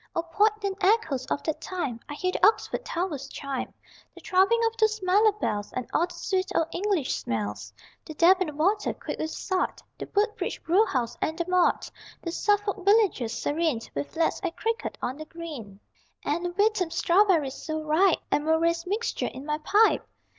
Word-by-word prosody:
O 335 Hz, -, 0 dB
poignant 405 Hz, +3 st, 0 dB
echoes 375 Hz, -, +2 dB
of 285 Hz, -, -2 dB
that 315 Hz, -, -2 dB
time! 285 Hz, -11 st, -3 dB
I 290 Hz, -, -5 dB
hear 365 Hz, +4 st, -1 dB
the -, -, -4 dB
Oxford 440 Hz, +4 st, +3 dB
towers 330 Hz, -6 st, -3 dB
chime, 275 Hz, -1 st, -5 dB, 0.4 s
The -, -, -12 dB
throbbing 385 Hz, +5 st, +3 dB
of 455 Hz, 0 st, 0 dB
those 435 Hz, 0 st, +2 dB
mellow 410 Hz, +4 st, +5 dB
bells 210 Hz, -, -3 dB
And 250 Hz, -2 st, -4 dB
all 340 Hz, -, +2 dB
the 350 Hz, -, -12 dB
sweet 370 Hz, +1 st, -1 dB
old 325 Hz, 0 st, +2 dB
English 375 Hz, -7 st, 0 dB
smells 105 Hz, -2 st, -4 dB, 0.3 s
The 315 Hz, -, -9 dB
Deben 345 Hz, -2 st, +4 dB
water, 395 Hz, +7 st, +1 dB
quick -, -, -6 dB
with 315 Hz, -, -2 dB
salt, 375 Hz, +2 st, -2 dB, 0.2 s
The -, -, -6 dB
Woodbridge 425 Hz, +2 st, 0 dB
brew 395 Hz, +7 st, +3 dB
house 245 Hz, -4 st, -1 dB
and 315 Hz, -, -1 dB
the 340 Hz, -, -1 dB
malt; 365 Hz, -1 st, +2 dB, 0.3 s
The 335 Hz, -, -3 dB
Suffolk 410 Hz, +1 st, 0 dB
villages, 395 Hz, -, +3 dB
serene 310 Hz, -4 st, 0 dB
With 140 Hz, 0 st, -5 dB
lads 325 Hz, 0 st, +1 dB
at 345 Hz, -2 st, -3 dB
cricket 455 Hz, +1 st, -2 dB
on 255 Hz, +3 st, -2 dB
the 310 Hz, -, -7 dB
green, 295 Hz, -, -8 dB, 0.5 s
And 345 Hz, +4 st, -1 dB
Wytham 410 Hz, -4 st, +2 dB
strawberries, 340 Hz, -4 st, +3 dB
so 315 Hz, 0 st, -3 dB
ripe, 320 Hz, +4 st, +3 dB
And 295 Hz, -, +2 dB
Murray's 335 Hz, +2 st, +1 dB
Mixture 425 Hz, +5 st, -1 dB
in 265 Hz, +2 st, -9 dB
my 300 Hz, 0 st, -1 dB
pipe! 415 Hz, +8 st, +3 dB
340 Hz, 175 wpm, -27 LUFS, 300-400 Hz, 0.5 s, mellow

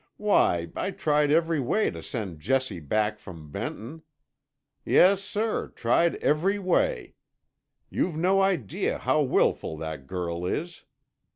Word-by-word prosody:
Why, 85 Hz, -, +2 dB
I -, -, -2 dB
tried 150 Hz, -5 st, +1 dB
every 165 Hz, 0 st, +2 dB
way 140 Hz, -, +1 dB
to -, -, -8 dB
send 100 Hz, -, -5 dB
Jessie 130 Hz, -, -1 dB
back 105 Hz, +7 st, -1 dB
from 80 Hz, -7 st, -11 dB
Benton. 130 Hz, -, -6 dB, 0.8 s
Yes, 195 Hz, +1 st, +5 dB
sir, 215 Hz, +2 st, -2 dB
tried 165 Hz, +8 st, +2 dB
every 180 Hz, +7 st, +1 dB
way. 200 Hz, -, 0 dB, 0.8 s
You've 175 Hz, -, -1 dB
no 185 Hz, +4 st, +2 dB
idea 180 Hz, -, 0 dB
how -, -, +1 dB
wilful 80 Hz, -, +1 dB
that 80 Hz, -4 st, -6 dB
girl 85 Hz, 0 st, -4 dB
is." 170 Hz, -, -4 dB
145 Hz, 125 wpm, -26 LUFS, -, 0.8 s, Yes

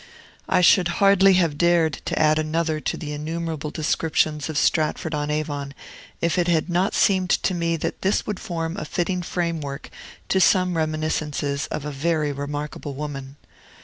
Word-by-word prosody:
I -, -, +3 dB
should 180 Hz, 0 st, +5 dB
hardly 195 Hz, -1 st, +6 dB
have 165 Hz, -5 st, +1 dB
dared 170 Hz, -3 st, +2 dB
to -, -, -2 dB
add 155 Hz, 0 st, +4 dB
another 155 Hz, 0 st, -1 dB
to -, -, -3 dB
the 150 Hz, -3 st, -5 dB
innumerable 160 Hz, 0 st, -4 dB
descriptions 155 Hz, -1 st, 0 dB
of 155 Hz, -, -3 dB
Stratford 155 Hz, +2 st, +1 dB
on 150 Hz, 0 st, -2 dB
Avon, 145 Hz, -2 st, -3 dB, 0.5 s
if 170 Hz, +1 st, +1 dB
it 175 Hz, -, +1 dB
had 170 Hz, 0 st, +1 dB
not 180 Hz, +4 st, +1 dB
seemed 185 Hz, -2 st, +3 dB
to 185 Hz, -, +2 dB
me 170 Hz, -1 st, 0 dB
that -, -, -4 dB
this 195 Hz, +2 st, +1 dB
would 210 Hz, -3 st, -4 dB
form 165 Hz, 0 st, -4 dB
a 175 Hz, -, -4 dB
fitting 180 Hz, +3 st, -1 dB
framework 165 Hz, -5 st, -3 dB, 0.4 s
to 190 Hz, -, +3 dB
some 185 Hz, -1 st, +3 dB
reminiscences 155 Hz, -2 st, -1 dB
of 150 Hz, -, -5 dB
a 150 Hz, -, -3 dB
very 150 Hz, +1 st, 0 dB
remarkable 145 Hz, 0 st, -5 dB
woman. 140 Hz, -2 st, -6 dB
160 Hz, 165 wpm, -23 LUFS, 150-175 Hz, 0.5 s, hardly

